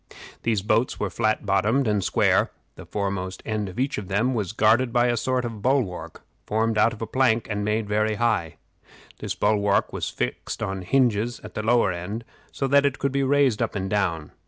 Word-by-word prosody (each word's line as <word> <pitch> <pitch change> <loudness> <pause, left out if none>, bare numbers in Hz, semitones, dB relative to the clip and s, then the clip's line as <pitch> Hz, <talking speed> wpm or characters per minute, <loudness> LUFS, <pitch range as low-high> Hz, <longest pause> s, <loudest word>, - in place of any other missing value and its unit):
These 110 -4 0
boats 115 +4 +1
were 100 -2 -2
flat 110 +1 0
bottomed 105 +7 +2
and 105 -2 +1
square; - - +2 0.2
the - - -12
foremost 95 -2 -3
end 105 -3 -2
of 95 - -8
each 135 -1 0
of 100 - -8
them 110 +7 +1
was 105 -6 -2
guarded 110 +3 +3
by 120 +1 +3
a 120 - +1
sort 125 +1 0
of 115 -3 -6
bulwark, 125 -7 -1 0.2
formed 110 0 +1
of 115 +1 +3
plank, 125 -4 +2
and 105 0 -1
made 105 +1 0
very 110 +1 +1
high. 105 -8 0 0.6
This - - -4
bulwark 105 -1 +1
was - - -2
fixed 60 0 -4
on 95 0 -3
hinges 120 +1 +1
at - - -10
the - - -3
lower 115 -2 +3
end, 95 +7 -5 0.3
so 135 - -2
that 140 +1 +4
it 140 -2 +1
could 140 - -1
be 140 +1 0
raised 135 -4 +2
up 115 - -1
and 95 -1 -3
down. 85 -7 -1
110 Hz, 195 wpm, -24 LUFS, 100-120 Hz, 0.6 s, that